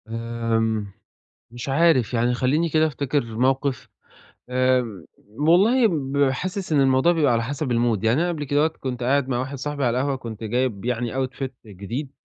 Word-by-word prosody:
آمم، 115 -2 -2 0.6
مش 120 +2 -7
عارف، 135 -5 +3
يعني 120 +1 +2
خلّيني 140 +7 +1
كده 155 0 +3
أفتكر 140 -2 -1
مَوقِف، 130 +4 -1 0.6
آمم، 130 -1 +2 0.5
م 150 +2 +1
والله 225 +8 +5
ب 140 -5 +1
حاسس 185 +6 -4
إن 145 - +4
الموضوع 135 +4 +4
بيبقى 150 -7 +2
على 115 0 +1
حسب 140 +4 -3
الmood 115 -2 +1
يعني 110 0 +3
أنا 175 - +1
قَبل 165 -4 -3
كدهوّة 145 +2 +2
كنت 130 -6 -5
قاعد 135 +1 +1
مع 120 -2 0
واحد 135 +2 -4
صاحبي 145 +1 -3
على 120 +1 +1
القهوة 140 +1 0
كنت 115 -4 -8
جايب 120 -2 -1
يعني 120 -1 -2
outfit 130 +1 -5 0.2
جديد 110 +8 -6
130 Hz, 170 wpm, -23 LUFS, 120-145 Hz, 0.6 s, والله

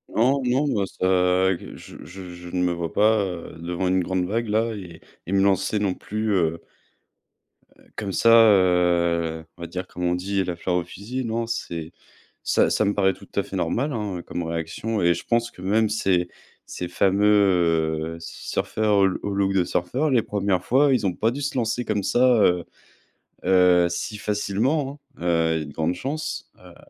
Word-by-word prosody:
Non, 130 +5 +3
non 130 +4 +2
moi 100 -6 0
ça 95 0 +2
je - - -11 0.3
je 90 0 -10
je 90 0 -11
ne 90 +1 -1
me 90 - +2
vois 85 -1 -4
pas, 110 0 +4
heu, 85 -3 -7
devant 90 +2 -2
une 95 0 +2
grande 90 0 -1
vague 115 +5 -2
là 110 +2 0
et 90 -6 -9 0.2
et 90 - -6
me 100 - +3
lancer 100 +2 +1
non 100 -3 0
plus, 110 0 -3
heu 85 -3 0 1.2
heu, - - -23
comme 100 -2 -4
ça, 115 - +3
heu, 90 -6 +4
on - - -14
va - - -5
dire 90 +2 -6
comme 90 - -7
on 90 0 +2
dit: 95 +2 -1
«La 90 -2 -3
fleur 90 +1 -2
au 90 - +1
fusil». 115 +9 -6
Non 115 0 -2
c'est 85 -8 -4 0.5
ça - - +2
ça 110 - +1
me 100 - +1
paraît 95 -2 +2
tout - - -15
à - - +2
fait - - -8
normal, 140 +4 -1
hein, 105 -6 -3
comme 85 - -4
réaction, 85 +7 -3
et 85 0 +3
je 85 - -8
pense 115 0 +1
que 90 - -13
même 110 +3 +2
ces 95 -4 +1 0.4
ces 90 - -5
fameux 85 -5 +2
surfeurs 105 +5 -1
au 95 - +5 0.2
au 100 - -2
look 100 0 +1
de 95 -2 +3
surfeurs, 120 - -1
les 125 -3 +4
1re 100 -4 -1
fois, 135 +2 +3
ils 115 -6 +1
ont 90 - -1
pas 110 +2 +1
dû 140 +4 -5
se 140 -1 -2
lancer 120 0 0
comme 105 -3 -1
ça, 120 0 +4
heu 90 -2 +3 0.8
heu, 90 -2 +5
si 95 +5 -4
facilement, 125 +9 -1 0.2
hein, - - -11
heu, 80 -2 +2
il - - 0
y - - -3
a - - -6
de 75 - -10
grande 80 +4 -1
chance, 150 - -5
heu. - - -15
95 Hz, 200 wpm, -23 LUFS, 90-110 Hz, 1.2 s, au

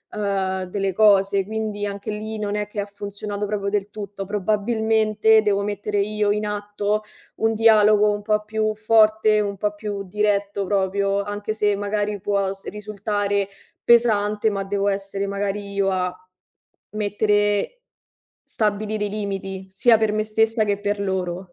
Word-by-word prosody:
uhm, 195 -2 -1
delle 195 +1 -2
cose, 200 -1 +4
quindi, 215 -1 -4
anche 200 +2 -5
lì, 215 +1 -5
non 205 -1 -3
è 210 0 -2
che 210 - -6
ha 205 - -1
funzionato 205 0 -5
proprio 200 -1 -2
del 205 0 -1
tutto. 200 -1 -7
Probabilmente, 215 +1 +2
devo 200 -1 +1
mettere 205 0 -3
io 210 0 0
in 210 +1 0
atto 205 0 -2 0.4
un 225 0 +1
dialogo 210 -1 +5
un 205 0 -3
po' 210 0 0
più 215 0 -1
forte, 215 0 +4
un 200 -1 -2
po' 210 +1 -1
più 205 -1 -5
diretto 200 0 0
proprio, 200 0 +1
anche 205 +1 -4
se 210 -1 +2
magari 205 0 -2
può 200 -1 0
s 195 - -13
risultare 205 -1 -2 0.4
pesante, 215 -2 +3
ma 195 -1 -2
devo 200 +1 0
essere 195 0 -3
magari 200 0 -3
io 195 -1 +1
a 180 -1 -1 0.8
mettere 205 - 0 0.7
stabilire 210 0 -1
i 205 - -3
limiti, 195 -2 -4
sia 225 +4 +4
per 220 -1 +1
me 215 0 0
stessa 220 +1 +1
che 205 -1 0
per 205 0 -1
loro. 185 -2 -3
205 Hz, 155 wpm, -22 LUFS, 200-215 Hz, 0.8 s, dialogo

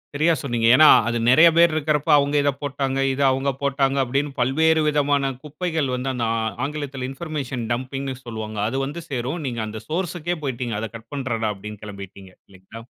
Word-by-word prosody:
சரியா 160 +3 +3
சொன்னீங்க. 120 -4 0
ஏன்னா 155 +2 +7 0.2
அது 120 0 0
நெறைய 155 +7 +7
பேர் 170 -1 +6
இருக்றப்போ 150 0 0
அவுங்க 145 +1 +1
இத 145 - +2
போட்டாங்க. 135 -1 -2 0.2
இத 140 - -3
அவுங்க 135 +1 0
போட்டாங்க 135 0 +1
அப்டின்னு 140 +3 -1
பல்வேறு 160 +5 +3
விதமான 145 -2 +1
குப்பைகள் 155 -1 -2
வந்து 130 +1 -2
அந்த 120 -2 -2 0.4
ஆங்கிலத்தில 140 -3 -5
இன்பர்மேஷன் 135 -6 -5
டம்பிங்ன்னு 130 +2 -4
சொல்வாங்க. 110 -2 -6
அது 135 +4 -2
வந்து 160 +5 -6
சேரும். 135 +5 -3
நீங்க 120 -2 -3
அந்த 110 0 -7
சோர்ஸ்க்கு 175 0 -2
போய்ட்டீங்க 120 -4 -3
அத 115 - -4
கட் 115 +3 -20
பண்றேன்டா 120 -5 -2
அப்டின்னு 105 +1 -9
கெளம்பிட்டீங்க. 100 -2 -10 0.2
இல்லைங்களா. 100 +4 -13
135 Hz, 165 wpm, -22 LUFS, 120-150 Hz, 0.4 s, ஏன்னா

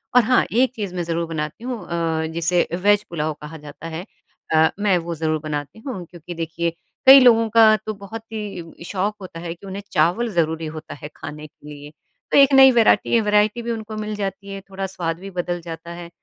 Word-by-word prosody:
और 250 - +7
हाँ, 250 +3 +3
एक 255 +2 +2
चीज़ 200 -5 -5
मैं 175 - -1
ज़रूर 170 0 -2
बनाती 155 +5 -5
हूँ 250 -2 -4
अ, 165 -2 -1
जिसे 170 +1 +1 0.2
वेज़ 205 0 +4
पुलाव 155 -2 -2
कहा 150 +2 -8
जाता 150 +2 -10
है। 165 +3 -6 0.5
अ, 160 0 +5
मैं 200 -3 +3
वो 170 0 -4
ज़रूर 155 0 -1
बनाती 150 +5 -5
हूँ, 220 -8 -6
क्योंकि 175 0 -10
देखिए 165 0 -2 0.4
कई 270 +1 +11
लोगों 230 -3 +5
का 220 0 +6
तो 215 - -3
बहुत 200 +3 -8
ही 195 -7 -7
शौक 200 +3 -2
होता 180 -3 -9
है 165 0 -5
कि 175 - -16
उन्हें 195 +1 -6
चावल 175 +9 +2
ज़रूरी 160 -1 0
होता 155 - -8
है 145 0 -9
खाने 150 +1 -8
के 150 0 -18
लिए। 145 0 -10 0.4
तो - - +4
एक 275 0 +6
नई 265 0 +9
वैराटी 235 0 +4
वैरायटी 210 +2 +2
भी 235 0 -3
उनको 220 -1 -5
मिल 215 0 -4
जाती 200 -1 -5
है, 195 - -7
थोड़ा 195 0 -4
स्वाद 170 -3 -4
भी 195 +2 -8
बदल 175 0 -2
जाता 165 0 -8
है। 170 - -9
175 Hz, 210 wpm, -21 LUFS, 165-215 Hz, 0.5 s, कई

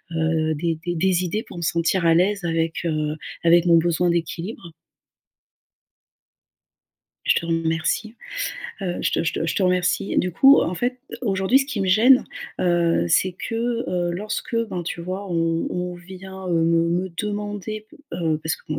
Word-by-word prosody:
heu, 160 -1 +1
des 165 +1 -1
des 175 0 -1
des 185 +1 +2
idées 210 +5 -2
pour - - -12
me - - -5
sentir 170 +2 +1
à 165 - +5
l'aise 195 +2 +2
avec, 165 0 -1
heu, 155 -1 -1 0.3
avec 170 +1 +5
mon 170 -1 +6
besoin 175 +1 +2
d'équilibre? 170 +1 -4 2.5
Je - - +4
te 170 - -1
remercie. 165 +7 -1 0.7
Heu, 180 -3 -2
je - - +1
te - - +1
je - - 0
te 165 - -2
je - - -1
te 195 - 0
remercie. 180 0 +1
Du 180 -1 0
coup, 275 +9 +7
en 180 - -1
fait, 250 +5 -2 0.2
aujourd'hui, 195 +3 +3
ce - - 0
qui 255 -8 -3
me 195 - 0
gêne, 230 +8 +6 0.4
heu, 170 - +2
c'est 185 - +3
que, 225 - -6 0.3
heu, 175 -1 0
lorsque, 215 +5 -3
ben, 180 -2 -4
tu 170 - -5
vois? 185 +3 -5
On 165 -1 0
on 180 0 -3
vient, 190 +1 -9
heu, - - 0
me 165 0 +3
me 180 +2 0
demander 210 +1 -4
p 320 - -17 0.2
heu, 160 -3 0
parce 160 - -1
que, - - -21
bon, 150 - -2
175 Hz, 180 wpm, -23 LUFS, 165-190 Hz, 2.5 s, coup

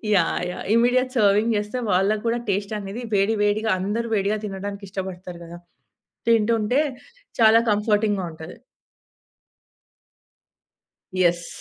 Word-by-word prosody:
Yeah! 170 -4 +1
Yeah! - - -7
Immediate 250 +2 +3
serving 210 +2 +3
జేస్తే 210 +4 -3
వాళ్ళకి 200 +4 +1
కూడా 230 +1 +1
టేస్ట్ 200 +2 -1
అనేది 200 +4 -6
వేడి 200 +3 +2
వేడిగా 215 +2 +1
అందరు 210 +5 -2
వేడిగా 205 +1 0
తినడానికి 200 0 -6
ఇష్టపడతారు 185 -2 -6
గదా! 170 +1 -10 0.7
తింటుంటే 230 +3 +2 0.6
చాలా 220 0 +7
కంఫర్‌టింగ్‌గా 210 -2 +1
ఉంటది. 160 +2 -10 2.6
యెస్. 175 -2 +1
205 Hz, 110 wpm, -23 LUFS, 190-220 Hz, 2.6 s, చాలా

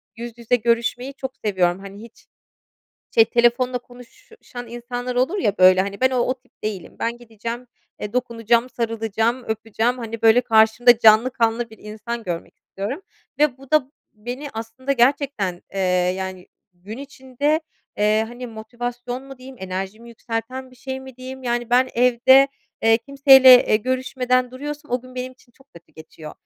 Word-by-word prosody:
yüz 235 0 -8
yüze 235 +1 +1
görüşmeyi 240 +3 0
çok 265 -1 -6
seviyorum. 185 -3 +1
Hani, 200 +1 -11
hiç 230 0 -15 0.9
şey, 455 - +7
telefonla 240 - +2
konuşan 245 - -13
insanlar 245 +1 -5
olur 265 +11 +1
ya 205 - 0
böyle, 185 0 +7
hani, 200 +1 -3
ben 260 0 +4
o 255 - 0
o 255 +1 +1
tip 255 - -34
değilim. 205 -5 -5
Ben 235 +1 -2
gideceğim, 235 +1 -7 0.5
dokunacağım, 235 -1 +1
sarılacağım, 230 +1 -1
öpeceğim. 225 +3 -1
Hani, 230 -1 -6
böyle 225 +2 +6
karşımda 225 +1 +5
canlı 225 +2 +6
kanlı 230 -1 0
bir 220 - -15
insan 220 +3 -6
görmek 175 -4 -6
istiyorum 220 - -6 0.4
ve 290 -4 +2
bu 270 -1 -16
da 300 -4 +2 0.2
beni 245 +7 -7
aslında 230 +5 -4
gerçekten, 245 -8 +1
eee, 195 - -2 0.4
yani 190 -1 -6 0.3
gün 195 +6 -10
içinde, 280 +2 -2 0.4
eee, 215 +1 +3
hani 245 +1 -8
motivasyon 245 +2 -6
mu 270 -1 -12
diyeyim, 260 +1 -12
enerjimi 190 +5 -6
yükselten 235 +3 -5
bir 255 - -19
şey 265 +2 -6
mi 265 -2 -12
diyeyim. 260 +1 -9
Yani 240 -1 -2
ben 255 +1 +4
evde, 250 +3 +5 0.3
eee, 225 0 +5
kimseyle, 265 -1 +7
eee, - - +4
görüşmeden 255 +1 0
duruyorsam 295 +3 -7
o 245 +1 0
gün 255 0 -14
benim 255 0 -5
için 250 -1 -26
çok 270 +3 -24
kötü 170 0 -17
geçiyor. 160 0 -11
240 Hz, 160 wpm, -22 LUFS, 220-255 Hz, 0.9 s, şey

